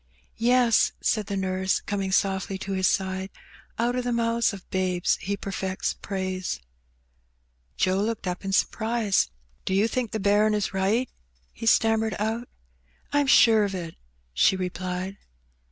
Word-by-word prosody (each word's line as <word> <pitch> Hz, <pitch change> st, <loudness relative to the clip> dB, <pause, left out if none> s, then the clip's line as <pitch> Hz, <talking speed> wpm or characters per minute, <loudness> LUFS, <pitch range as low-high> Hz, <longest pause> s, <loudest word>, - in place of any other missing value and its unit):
" -, -, -38 dB, 0.2 s
Yes," 240 Hz, -3 st, +4 dB
said 215 Hz, -3 st, 0 dB
the 200 Hz, -, -2 dB
nurse, 190 Hz, 0 st, 0 dB
coming 195 Hz, -2 st, -3 dB
softly 190 Hz, 0 st, 0 dB
to 195 Hz, +1 st, -6 dB
his 190 Hz, -1 st, +2 dB
side, 190 Hz, 0 st, -1 dB, 0.3 s
" -, -, -27 dB
out 240 Hz, +2 st, +1 dB
of 250 Hz, -, -1 dB
the 245 Hz, -, -1 dB
mouths 235 Hz, 0 st, +1 dB
of 195 Hz, -3 st, -10 dB
babes 185 Hz, -2 st, +1 dB
He 200 Hz, +2 st, -2 dB
perfects 190 Hz, -1 st, -3 dB
praise/' 185 Hz, -, -3 dB, 1.2 s
Joe 185 Hz, +1 st, +2 dB
looked 220 Hz, 0 st, -2 dB
up 180 Hz, +1 st, -3 dB
in 195 Hz, -, -3 dB
surprise. 220 Hz, +1 st, +1 dB
^^ -, -, -22 dB, 0.3 s
Do 190 Hz, -, -1 dB
you 205 Hz, +3 st, +3 dB
think 245 Hz, -1 st, -2 dB
the 220 Hz, -, -3 dB
bairn 210 Hz, +2 st, +3 dB
is 205 Hz, -2 st, -1 dB
right?" 200 Hz, +7 st, +1 dB, 0.5 s
he 225 Hz, -, -6 dB
stammered 225 Hz, -2 st, +3 dB
out. 225 Hz, +3 st, -2 dB, 0.3 s
'' -, -, -28 dB
I'm 290 Hz, -1 st, +3 dB
sure 225 Hz, -4 st, +6 dB
of 200 Hz, -1 st, -2 dB
it," 170 Hz, -3 st, -6 dB, 0.4 s
she 130 Hz, -, +4 dB
replied. 185 Hz, +1 st, -4 dB
195 Hz, 165 wpm, -26 LUFS, 190-225 Hz, 1.2 s, sure